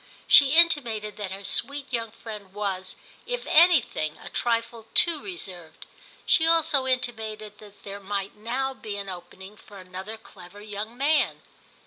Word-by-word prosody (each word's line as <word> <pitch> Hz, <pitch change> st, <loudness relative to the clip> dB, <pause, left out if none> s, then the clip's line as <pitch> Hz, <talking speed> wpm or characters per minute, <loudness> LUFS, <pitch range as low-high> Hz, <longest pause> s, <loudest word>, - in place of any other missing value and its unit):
She 275 Hz, -1 st, +7 dB
intimated 240 Hz, -11 st, +4 dB
that 205 Hz, -2 st, -4 dB
her 195 Hz, +1 st, -8 dB
sweet 280 Hz, +6 st, -2 dB
young 230 Hz, -1 st, -1 dB
friend 210 Hz, -3 st, -10 dB
was, 190 Hz, -3 st, -3 dB, 0.3 s
if -, -, -3 dB
anything, 310 Hz, -, +4 dB
a -, -, -10 dB
trifle 230 Hz, -1 st, -2 dB
too 330 Hz, -4 st, +4 dB
reserved; 185 Hz, -, -9 dB, 0.4 s
she 325 Hz, -1 st, +4 dB
also 320 Hz, -5 st, +3 dB
intimated 220 Hz, -5 st, -3 dB
that 205 Hz, -1 st, -16 dB
there 200 Hz, 0 st, -7 dB
might 200 Hz, 0 st, -4 dB
now 250 Hz, +5 st, -2 dB
be 210 Hz, -5 st, -7 dB
an 200 Hz, -1 st, -6 dB
opening 190 Hz, +2 st, -10 dB
for 205 Hz, -, -15 dB
another 190 Hz, +3 st, -8 dB
clever 195 Hz, -3 st, -15 dB
young 210 Hz, +2 st, -7 dB
man. 295 Hz, +3 st, +1 dB
215 Hz, 145 wpm, -26 LUFS, 200-265 Hz, 0.4 s, She